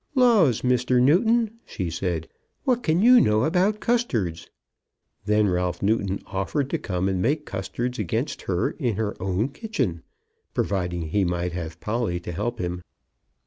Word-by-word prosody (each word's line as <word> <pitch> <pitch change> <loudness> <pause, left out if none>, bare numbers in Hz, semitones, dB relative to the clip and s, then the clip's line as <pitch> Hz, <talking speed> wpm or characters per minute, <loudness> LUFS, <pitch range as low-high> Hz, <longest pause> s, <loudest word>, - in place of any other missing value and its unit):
"Laws, 220 - +4
Mr. 125 0 +2
Newton," 220 - +3
she 90 -5 -4
said, 85 -2 -2 0.4
"what 250 -3 +1
can 170 -2 +2
you 250 +1 +8
know 105 +1 +3
about 185 +7 +2
custards?" 115 - -1 0.8
Then 105 0 +3
Ralph 90 -1 -1
Newton 100 -2 0
offered 130 +9 -2
to 165 - 0
come 95 -8 -2
and 95 -1 0
make 150 +7 0
custards 120 +6 -4
against 100 -6 -2
her - - +1
in 120 -5 -2
her 105 0 -2
own 95 +6 0
kitchen, 135 - -3 0.5
providing 90 -4 -1
he 100 +4 +2
might 90 0 -1
have 85 -1 -6
Polly 110 -5 -1
to 85 - -6
help 115 +7 -3
him. 90 -2 -3
110 Hz, 150 wpm, -24 LUFS, 90-150 Hz, 0.8 s, you